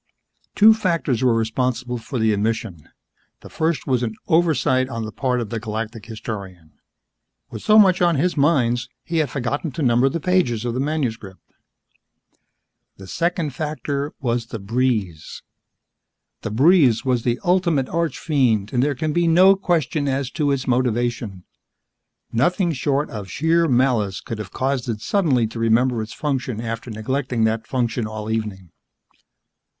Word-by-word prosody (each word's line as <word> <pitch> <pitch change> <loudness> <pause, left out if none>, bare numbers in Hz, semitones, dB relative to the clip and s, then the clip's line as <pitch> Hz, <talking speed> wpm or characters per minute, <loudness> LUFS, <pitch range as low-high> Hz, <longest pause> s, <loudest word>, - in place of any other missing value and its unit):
Two 220 +1 +7
factors 165 - -1
were 125 -3 +4
responsible 125 +2 -1
for 130 +3 -6
the 110 -2 +2
omission. 100 -6 -3 0.5
The - - -13
first 160 -4 -1
was 130 -3 +1
an 110 -3 -3
oversight 135 -6 +2
on 115 -3 -4
the 110 - -6
part 125 +1 -1
of 115 -3 -5
the 115 - -2
Galactic 110 0 -5
Historian. 100 -7 -7 0.8
With - - -7
so 215 - +4
much 190 -4 +5
on 170 -2 +3
his 175 +6 +1
minds, 125 -6 +2
he 165 - -3
had 155 -3 +1
forgotten 140 +4 -3
to 155 - -3
number 125 +1 +3
the 165 - -3
pages 150 -10 +1
of 120 - -1
the 125 - -2
manuscript. 125 -10 -4 1.4
The 95 - -11
second 170 - -1
factor 145 0 -3
was 120 -4 -1
the 115 - -6
breeze. 105 -6 -2 1.0
The - - -4
breeze 135 - +4
was 125 -2 +1
the 120 +1 -1
ultimate 175 -6 +2
archfiend 135 -10 0
and 125 - +2
there 145 +1 +1
can 155 +4 -2
be 175 +1 +2
no 185 +4 +6
question 160 -6 0
as 135 -1 -1
to 150 -2 0
its 135 -2 0
motivation. 120 -5 -1 0.9
Nothing 175 - +1
short 140 +1 -1
of 105 -3 -7
sheer 165 - +2
malice 120 -7 +1
could 115 -4 -7
have 105 - -6
caused 130 -2 -2
it 110 -2 -2
suddenly 140 - +1
to 115 +1 -6
remember 115 +1 +2
its 110 0 -6
function 130 -4 -3
after 115 +1 -5
neglecting 120 +2 -2
that 110 0 0
function 120 -3 -1
all 110 0 -5
evening. 105 -5 -4
125 Hz, 155 wpm, -21 LUFS, 115-150 Hz, 1.4 s, Two